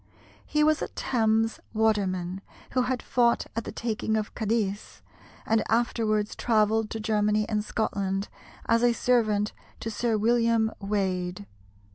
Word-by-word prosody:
He 300 0 +2
was 310 0 +3
a - - -1
Thames 225 -2 0 0.2
waterman, 195 -4 0 0.3
who 255 - +2
had 250 0 -1
fought 240 -1 +2
at 230 - -2
the - - -5
taking 220 -1 -1
of 215 -1 -3
Cadiz, 215 -2 -2 0.4
and 220 0 +2
afterwards 220 -2 +1
travelled 220 -1 +2
to 225 - -4
Germany 210 -1 +1
and 210 -1 -1
Scotland 200 -2 -2 0.4
as 230 0 +3
a 240 0 +4
servant 215 -4 +1 0.3
to 225 - -4
Sir 225 +1 0
William 230 0 +2
Waade. 190 -2 -2
220 Hz, 135 wpm, -27 LUFS, 210-230 Hz, 0.4 s, a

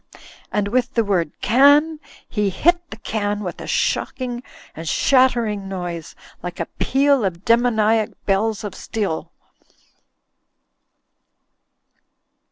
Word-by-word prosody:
" - - -21
And 205 -1 0
with 255 +3 0
the 230 - +3
word 180 -7 0
"Can" 290 +6 +5 0.3
he 210 -3 0
hit 345 - +1
the 220 - -8
can 210 -1 -2
with 180 -3 -6
a - - -7
shocking 245 -2 -1 0.3
and 160 0 -5
shattering 235 - +2
noise, 175 -4 -5 0.3
like 180 0 -6
a - - -1
peal 275 -1 +3
of 180 -2 -3
demoniac 225 -2 +3 0.2
bells 215 +2 0
of 205 -2 -5
steel. 200 -5 -3
220 Hz, 115 wpm, -21 LUFS, 195-250 Hz, 0.3 s, Can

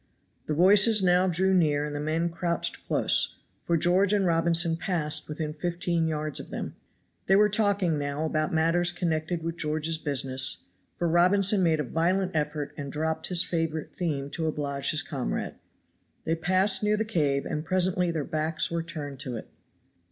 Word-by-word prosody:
The 150 - -1
voices 205 +5 +5
now 180 +1 +3
drew 190 +2 +1
near 150 -5 +2
and 150 -1 -5
the - - -3
men 160 +3 -1
crouched 170 0 -1
close, - - +2 0.3
for 170 - +1
George 185 +5 +3
and 200 -2 +2
Robinson 165 0 +2
passed 165 -4 -2
within 150 0 -4
fifteen 170 +1 -1
yards 155 -1 -2
of - - -9
them. - - -6 0.5
They 190 - +4
were 210 +1 +4
talking 200 -6 +1
now 145 +2 -3
about 155 -1 -1
matters 165 +2 +2
connected 165 -1 -2
with 165 +1 -4
George's 155 +1 -1
business, 130 -3 0 0.3
for 175 - -1
Robinson 190 +4 +3
made 165 -3 +2
a - - 0
violent 180 +7 0
effort 150 -1 -2
and 140 -2 -6
dropped 160 +2 -2
his 180 -2 +3
favorite 165 -2 -3
theme 145 -5 -3
to 160 -1 -2
oblige 140 -3 -2
his 155 +2 +3
comrade. 135 -7 -4 0.7
They 160 - 0
passed 185 +4 +2
near 210 0 +1
the 220 - -1
cave, 145 -10 0
and 150 - -3
presently 180 0 +1
their 160 -3 -2
backs 155 +1 -1
were 170 0 -1
turned 150 -5 -7
to 130 -3 -5
it. - - -11
165 Hz, 175 wpm, -26 LUFS, 150-180 Hz, 0.7 s, voices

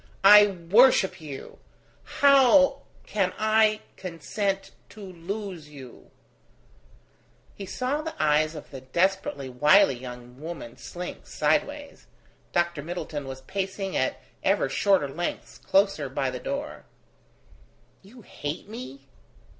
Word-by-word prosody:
I 205 +1 +9
worship 195 +2 +3
you! 145 -4 -9 0.6
How 275 0 +6 0.2
can 190 -3 -1
I 215 0 +3 0.2
consent 195 +3 -3 0.2
to 215 - -14
lose 185 -2 -7
you... 135 -4 -13 0.7
?" - - -32
He 195 - -9
saw 260 +8 -2
the 320 0 -6
eyes 155 +1 +2
of 150 - -10
the 135 -2 -8
desperately 170 0 -1
wily 150 +8 +5
young 125 +1 -10
woman 160 -7 -7
slink 180 0 -8
sideways. 285 - -1 0.4
Dr. 170 -3 0
Middleton 155 -3 -5
was 130 0 -7
pacing 190 +4 -4
at 130 - 0 0.2
ever - - +2
shorter 185 +2 +2
lengths 170 +6 -5
closer 195 -8 +1
by 130 0 -2
the 125 - -6
door. 280 - -5 1.2
"You 225 +4 -16
hate 145 -1 -6
me?" 140 - -9
180 Hz, 115 wpm, -26 LUFS, 145-210 Hz, 1.2 s, I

